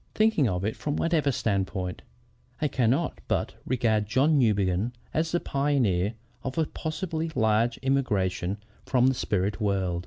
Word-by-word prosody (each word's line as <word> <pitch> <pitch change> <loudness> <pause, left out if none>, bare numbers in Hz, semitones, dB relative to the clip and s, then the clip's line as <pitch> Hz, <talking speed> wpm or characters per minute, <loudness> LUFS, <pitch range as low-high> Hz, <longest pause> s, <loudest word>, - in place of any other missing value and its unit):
"Thinking 215 - +3
of 90 +1 -2
it 110 - -1
from 145 -1 -3
whatever 155 -4 +2
standpoint, 95 -5 -2 0.6
I 150 - +1
cannot 135 +4 0
but - - 0
regard 110 -4 +1
John 140 +7 +3
Newbegin 105 -1 +2 0.2
as 160 +1 0
the 175 - +2
pioneer 120 - +1 0.3
of 130 +3 -4
a 160 - +3
possibly 160 +1 -3
large 110 0 +2
immigration 100 -8 0 0.3
from 130 -1 +2
the 130 - +4
spirit 105 -4 -1
world. 95 -4 0
120 Hz, 145 wpm, -27 LUFS, 100-145 Hz, 0.6 s, the